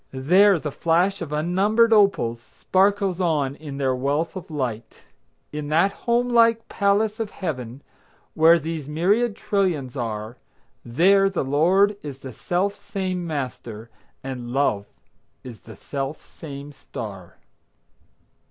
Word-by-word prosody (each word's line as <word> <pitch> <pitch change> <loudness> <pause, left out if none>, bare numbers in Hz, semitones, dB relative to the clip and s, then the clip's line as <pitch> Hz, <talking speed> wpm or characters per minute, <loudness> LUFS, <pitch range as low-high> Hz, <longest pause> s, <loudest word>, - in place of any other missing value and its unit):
There 180 +9 +4
the 150 -2 -5
flash 175 +6 +1
of 160 -4 -5
unnumbered 195 +9 +2
opals 195 - +3 0.2
Sparkles 195 -1 +1
on 150 -6 0
in 145 -2 -8
their 135 -2 +1
wealth 145 +7 -1
of 185 - -8
light. 120 -7 -5 0.5
In 150 -1 -5
that 165 +6 +3
home 235 +4 0
like 230 -1 +3
palace 205 +2 +1
of 225 -2 -2
Heaven, 130 - -6 0.5
Where 165 +2 +6
these 160 -2 -5
myriad 200 +9 +1
trillions 175 - -1
are, 110 -1 -4 0.5
There 195 +11 +3
the 190 -7 -2
Lord 185 +9 +3
is 145 -3 -7
the 135 -2 -9
self 180 - -1
same 190 -3 -4
Master, 120 -6 -6 0.3
And 125 -3 -6
Love 120 -6 0 0.6
is 120 -4 -10
the 110 - -13
self 140 +1 -5 0.2
same 145 -2 -8
star. 100 -9 -9
160 Hz, 130 wpm, -23 LUFS, 135-195 Hz, 0.6 s, Where